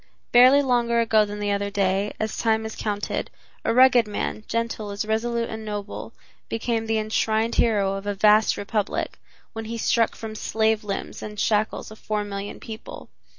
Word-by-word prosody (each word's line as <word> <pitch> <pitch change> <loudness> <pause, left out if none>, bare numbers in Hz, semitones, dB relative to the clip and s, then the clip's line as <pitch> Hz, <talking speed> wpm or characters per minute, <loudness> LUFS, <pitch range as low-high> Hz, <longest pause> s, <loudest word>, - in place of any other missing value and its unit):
Barely 255 +4 +7
longer 240 -2 +2
ago 220 -2 +4
than 205 0 -6
the 205 0 -1
other 200 0 -1
day, 200 0 0
as 220 0 -2
time 220 -1 +1
is 220 - -5
counted, 205 -1 -3 0.3
a - - +1
rugged 245 -1 +6
man, 210 +1 -3
gentle 230 -2 -2
as 200 +1 -3
resolute 230 +2 0
and 220 0 -6
noble, 205 -1 -5 0.4
became 225 0 -1
the 225 0 +1
enshrined 220 +1 0
hero 205 -4 +2
of 195 +1 -5
a 205 - -1
vast 210 +2 +4
republic, 205 0 -2 0.3
when 225 -1 -5
he 230 +1 -4
struck 230 0 +2
from 220 -1 -7
slave 220 0 0
limbs 200 -1 -4
the 210 0 -7
shackles 215 +1 0
of 220 - -12
four 210 -1 -2
million 200 0 -6
people. 220 0 -9
220 Hz, 175 wpm, -24 LUFS, 205-230 Hz, 0.4 s, Barely